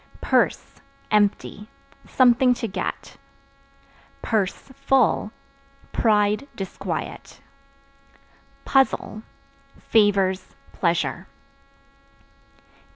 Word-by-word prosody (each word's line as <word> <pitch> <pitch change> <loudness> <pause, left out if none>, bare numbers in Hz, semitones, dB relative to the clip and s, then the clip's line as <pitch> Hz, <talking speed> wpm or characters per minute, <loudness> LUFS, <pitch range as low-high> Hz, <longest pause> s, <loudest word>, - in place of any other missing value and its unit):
Purse - - 0 0.3
(Empty) 210 0 0 0.4
something 250 0 +4
to 230 - -4
get; 190 - -5 1.1
(full) 225 +2 0 0.6
pride, 210 +3 +2
disquiet. 195 -1 -6 1.3
Puzzle 265 -5 +1 0.6
Favors, 195 -4 +1 0.2
pleasure. 170 +1 -1
210 Hz, 50 wpm, -23 LUFS, 195-245 Hz, 1.3 s, something